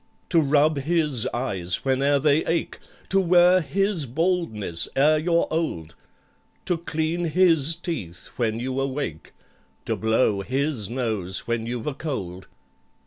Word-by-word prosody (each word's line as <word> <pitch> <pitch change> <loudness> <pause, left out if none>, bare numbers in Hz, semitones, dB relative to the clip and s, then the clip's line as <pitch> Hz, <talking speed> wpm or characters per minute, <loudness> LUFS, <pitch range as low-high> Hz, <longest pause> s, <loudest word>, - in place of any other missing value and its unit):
"To 170 - +4
rub 150 +1 +3
his 150 -5 +1
eyes 95 -8 -1
whene'er 135 +2 +2
they 145 +2 +2
ache— 165 0 -2 0.3
To 195 - +4
wear 180 0 +5
his 180 0 -1
baldness 120 - -1
ere 155 +3 +4
you're 170 +1 +2
old— 85 - -2 0.7
To 175 -2 0
clean 165 +1 -2
his 165 -2 +3
teeth 150 - -6
when 115 -2 -1
you 130 +2 -3
awake— 135 - -4 0.5
To - - -1
blow 110 -2 +1
his 130 -1 -2
nose 110 -7 -3
when 115 -1 -2
you've 120 -1 -4
a 150 - -2
cold!" 95 - -5
140 Hz, 135 wpm, -24 LUFS, 115-165 Hz, 0.7 s, wear